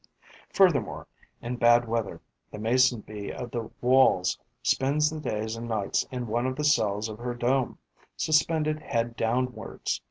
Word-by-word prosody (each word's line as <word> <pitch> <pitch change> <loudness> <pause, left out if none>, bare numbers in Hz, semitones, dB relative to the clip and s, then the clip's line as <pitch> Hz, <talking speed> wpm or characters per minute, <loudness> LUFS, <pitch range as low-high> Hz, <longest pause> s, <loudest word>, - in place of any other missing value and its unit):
Furthermore, 170 - +2 0.4
in 120 +1 -3
bad 120 0 +5
weather, 115 -2 -2 0.3
the - - -9
Mason 120 +2 +3
bee 105 -1 -7
of 120 -2 -7
the 115 -2 -4
Walls 125 -7 +4 0.3
spends 150 +3 +2
the 155 - -5
days 110 -5 -3
and 115 +1 -6
nights 105 -4 -1
in 125 -3 -4
one 120 +3 -1
of 130 - -2
the 150 - -3
cells 110 -7 +2
of 110 0 -8
her 120 0 -4
dome, 125 +2 0 0.4
suspended 155 0 +1
head 115 -5 -2
downwards. 120 0 -2
120 Hz, 155 wpm, -27 LUFS, 110-135 Hz, 0.4 s, bad